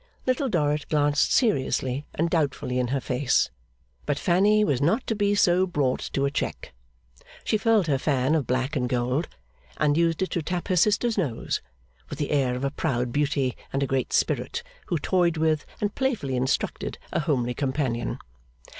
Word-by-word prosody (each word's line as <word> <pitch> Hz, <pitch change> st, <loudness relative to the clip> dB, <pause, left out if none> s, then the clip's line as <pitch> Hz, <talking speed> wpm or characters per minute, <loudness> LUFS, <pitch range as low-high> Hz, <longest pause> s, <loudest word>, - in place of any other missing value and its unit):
Little 255 Hz, +1 st, +1 dB
Dorrit 150 Hz, -5 st, 0 dB
glanced 145 Hz, -1 st, +2 dB
seriously 140 Hz, -, +1 dB
and 165 Hz, -, +1 dB
doubtfully 140 Hz, -6 st, 0 dB
in 125 Hz, -, 0 dB
her 135 Hz, +3 st, 0 dB
face, 125 Hz, +1 st, +1 dB, 0.6 s
but 145 Hz, -, +1 dB
Fanny 205 Hz, +4 st, +3 dB
was 140 Hz, -6 st, 0 dB
not 190 Hz, -, +2 dB
to -, -, 0 dB
be 205 Hz, -1 st, +1 dB
so 185 Hz, -1 st, +3 dB
brought 145 Hz, -7 st, 0 dB
to 140 Hz, -, +1 dB
a 140 Hz, -, 0 dB
check. -, -, -4 dB, 0.7 s
She -, -, 0 dB
furled 220 Hz, -3 st, +3 dB
her 140 Hz, -4 st, +1 dB
fan 135 Hz, 0 st, +1 dB
of 150 Hz, -6 st, +1 dB
black 130 Hz, +2 st, -1 dB
and 125 Hz, -3 st, 0 dB
gold, 125 Hz, +6 st, 0 dB, 0.5 s
and 150 Hz, -1 st, +2 dB
used 165 Hz, +1 st, +2 dB
it 185 Hz, -, -3 dB
to 170 Hz, -, -1 dB
tap 175 Hz, +3 st, -3 dB
her 185 Hz, -, +2 dB
sister's 210 Hz, +5 st, +2 dB
nose; 140 Hz, -11 st, -2 dB, 0.5 s
with 145 Hz, -, -6 dB
the 145 Hz, -2 st, -2 dB
air 135 Hz, -4 st, +2 dB
of 125 Hz, -, -4 dB
a 140 Hz, -, 0 dB
proud 125 Hz, -5 st, -1 dB
beauty 140 Hz, -2 st, 0 dB, 0.2 s
and 135 Hz, +1 st, 0 dB
a -, -, +2 dB
great 135 Hz, -1 st, -1 dB
spirit, 470 Hz, -, 0 dB, 0.2 s
who 175 Hz, -, 0 dB
toyed 170 Hz, +1 st, +1 dB
with 155 Hz, -1 st, +1 dB
and 205 Hz, 0 st, -1 dB
playfully 225 Hz, -, -1 dB
instructed 130 Hz, +1 st, -1 dB, 0.2 s
a -, -, +1 dB
homely 130 Hz, -7 st, 0 dB
companion. 130 Hz, -3 st, -2 dB
150 Hz, 180 wpm, -25 LUFS, 130-180 Hz, 0.7 s, Fanny